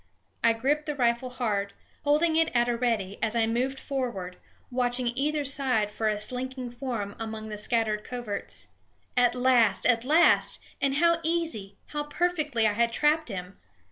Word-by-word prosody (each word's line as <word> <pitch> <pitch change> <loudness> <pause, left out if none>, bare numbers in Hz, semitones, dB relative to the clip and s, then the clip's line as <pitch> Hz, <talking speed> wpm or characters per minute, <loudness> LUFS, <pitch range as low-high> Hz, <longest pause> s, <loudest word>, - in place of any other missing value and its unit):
I 230 - +5
gripped 285 +7 0
the 300 - -2
rifle 240 -1 +1
hard, 210 -5 -2 0.3
holding 310 +3 +3
it 325 0 +3
at 240 0 +3
a 240 - +1
ready 225 -5 -1
as 220 0 0
I 230 -1 +3
moved 255 +4 -1
forward, 235 -10 -4 0.3
watching 245 -1 0
either 295 +2 0
side 255 -7 +1
for 220 +1 -1
a 210 -1 0
slinking 255 +2 -4
form 240 -5 -4
among 220 -1 -5
the 210 - -4
scattered 215 -1 0
coverts. 240 -5 -5 0.5
At 245 0 +3
last, 250 -3 +3
at 235 -2 +3
last! 315 +6 +4 0.2
and 275 -1 +2
how 335 +2 +4
easy, 320 -13 -2
how 295 0 -3
perfectly 300 -7 0
I 210 - +3
had 235 +2 +2
trapped 300 +3 +2
him! 185 -2 -7
245 Hz, 165 wpm, -27 LUFS, 220-280 Hz, 0.5 s, I